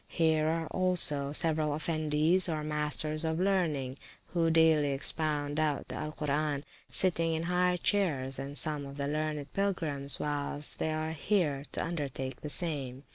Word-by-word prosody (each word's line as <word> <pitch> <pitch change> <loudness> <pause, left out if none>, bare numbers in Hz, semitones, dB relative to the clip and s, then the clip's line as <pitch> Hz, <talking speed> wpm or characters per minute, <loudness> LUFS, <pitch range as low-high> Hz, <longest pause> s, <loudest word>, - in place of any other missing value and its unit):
Here 160 -2 +2
are 165 +1 0
also 165 -6 +2
several 155 -1 +2
Effendies, 155 +3 +2
or 155 -2 -2
masters 150 +1 +1
of 160 0 -1
learning, 160 -9 0 0.3
who 165 -2 +2
daily 160 -3 +4
expound 145 +1 -1
out 150 -2 +1
of - - -15
the - - -5
Alcoran, 150 -1 -2 0.2
sitting 165 -3 +2
in 160 - -2
high 180 +1 +2
chairs, 150 -10 0
and 140 +1 -5
some 150 -2 0
of 140 +1 -10
the 140 0 -2
learned 150 -1 -3
Pilgrims, 160 -9 0
whilst 145 0 -3
they 160 - 0
are 155 0 -2
here, 155 -4 0
do - - 0
undertake 135 -6 -4
the 150 - -5
same. 140 -6 -2
155 Hz, 155 wpm, -31 LUFS, 145-165 Hz, 0.3 s, daily